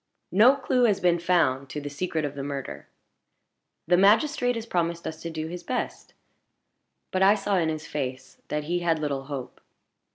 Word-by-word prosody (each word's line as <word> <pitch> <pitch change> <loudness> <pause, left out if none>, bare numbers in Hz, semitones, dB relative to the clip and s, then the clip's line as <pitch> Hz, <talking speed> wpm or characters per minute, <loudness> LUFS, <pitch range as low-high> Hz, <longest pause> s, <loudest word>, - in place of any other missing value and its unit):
"No 230 +9 +6
clue 255 -2 +2
has 210 -4 +2
been 175 -1 +2
found 145 -7 +1
to 150 - -4
the 145 - -6
secret 155 +1 -2
of 145 - -4
the 140 - -6
murder. 140 -1 -6 1.0
The 175 +2 +4
magistrate 245 - +3
has 225 -1 -4
promised 170 -5 -1
us 160 0 -6
to 170 - -5
do 160 -1 -4
his 175 +2 -6
best; 250 +7 -4 1.0
but 185 - 0
I 195 +2 +6
saw 200 -1 0
in 165 -3 +1
his 155 -1 -4
face 130 -3 -5
that 150 0 -2
he 175 +4 -1
had 170 -2 +1
little 140 -3 -3
hope. 135 -3 -7
170 Hz, 185 wpm, -26 LUFS, 145-195 Hz, 1.0 s, No